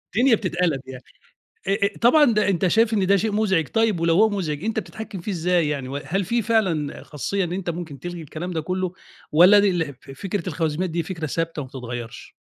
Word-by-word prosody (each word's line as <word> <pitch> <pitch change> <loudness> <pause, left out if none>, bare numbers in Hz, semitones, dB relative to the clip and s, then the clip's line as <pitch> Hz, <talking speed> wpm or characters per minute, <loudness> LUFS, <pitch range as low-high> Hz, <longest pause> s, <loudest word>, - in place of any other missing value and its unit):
الدنيا 245 +1 +5
بتتقلب 175 - -1
يعني، 130 -1 -9 0.6
أ 200 +1 +2
أ - - -12
طبعًا 295 +6 +6
ده 210 -1 +2
أنت 190 0 +2
شايف 225 +5 +3
إن 195 -3 +1
ده 200 +1 +5
شيء 215 +3 0
مُزعج 190 -7 +1
طيب 225 -6 +1
ولو 165 0 +2
هو 220 +4 +5
مُزعج 170 -7 -3
أنت 220 0 0
بتحكم 220 -3 -7
فيه 205 - -4
إزاي 175 -3 +1
يعني 140 -3 -3
وهل 155 +8 -2
في 235 +5 +1
فعلًا 195 -10 0
خاصيّة 190 +7 -2
إن 175 -1 -3
أنت 185 -1 -3
ممكن 165 -5 -6
تلغي 175 +2 -6
الكلام 160 +4 -6
ده 160 -2 -2
كلّه، 185 +2 -2 0.4
والّا 180 +7 +7
دي 205 - +4
الح 170 -5 -1
ف - - -12
فكرة 190 +5 -4
الخواريزميات 165 +2 -1
دي 170 +1 -1
فكرة 165 -1 -5
ثابتة 165 0 -2
ما 130 - -7
بتتغيّرش؟ 120 -3 -7
180 Hz, 210 wpm, -23 LUFS, 155-205 Hz, 0.6 s, والّا